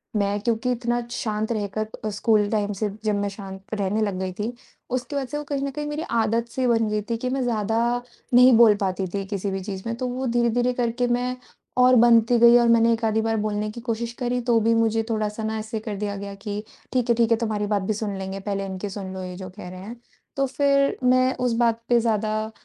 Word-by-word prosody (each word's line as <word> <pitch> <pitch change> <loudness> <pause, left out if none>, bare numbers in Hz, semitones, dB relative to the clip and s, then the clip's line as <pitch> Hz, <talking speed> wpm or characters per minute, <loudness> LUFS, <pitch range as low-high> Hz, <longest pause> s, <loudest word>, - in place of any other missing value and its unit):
मैं 205 0 +1
क्योंकि 230 +2 0
इतना 240 0 -1
शांत 220 -2 -2
रहकर 215 -1 -2 0.2
अ, - - 0
स्कूल 210 0 +2
टाइम 210 -1 0
से 210 +2 -2
जब 215 -1 +1
मैं 200 0 -1
शांत 195 -1 -9
रहने 205 +1 0
लग 200 -3 -1
गई 190 0 -2
थी। 215 +6 -4 0.4
उसकी 255 +3 -3
वजह 280 -1 -1
से 295 - -2
वो 295 - -4
कहीं 285 -1 -3
न - - -4
कहीं 295 +2 -4
मेरी 295 +1 -3 0.2
आदत-सी 235 +3 0
बन 225 -2 +2
गई 210 0 0
थी 230 - 0
कि 250 +2 -3
मैं 265 +1 -1
ज़्यादा 225 -2 0 0.6
नहीं 250 +1 +8
बोल 225 -3 +7
पाती 190 0 -2
थी 200 -1 -2
किसी 200 -1 -3
भी 195 - -2
चीज़ 190 -1 -6
में 230 - -2
तो 255 0 -2
वो 255 +2 -3
धीरे-धीरे 240 +1 +1
करके 245 0 0
मैं 245 +1 0 0.4
और 250 0 +6
बनती 235 0 +5
गई 235 +1 +8
और 240 -1 +4
मैंने 230 0 +5
1 230 +1 -3
आधी 220 0 +2
बार 225 0 0
बोलने 210 0 -1
की 235 - -9
कोशिश 230 0 -2
करी 250 -1 0
तो 235 -1 +3
भी 230 +1 +3
मुझे 225 0 +2
थोड़ा-सा 215 -1 -2
न 220 - -1
ऐसे 220 +1 -4
कर 215 -1 -5
दिया 205 0 -3
गया 200 0 -6
कि 205 +1 -5 0.3
ठीक 250 -2 0
है, 235 - +5
ठीक 230 0 +2
है 230 - +5
तुम्हारी 215 -2 -1
बात 205 -1 +1
भी 195 +3 -1
सुन 205 -1 -3
लेंगे 190 0 -5
पहले 195 0 -3
इनकी 190 +1 -5
सुन 190 -1 -6
लो 190 0 -6
ये 180 0 -6
जो 185 0 -7
कह 180 - -7
रहे 185 0 -9
हैं। 220 +5 -8 0.4
तो 275 - +2
फिर 275 +1 +2
मैं 255 +1 +4
उस 250 -2 0
बात 230 -1 +2
पे 240 -1 +5
ज़्यादा 215 -1 -1
225 Hz, 240 wpm, -24 LUFS, 205-240 Hz, 0.6 s, नहीं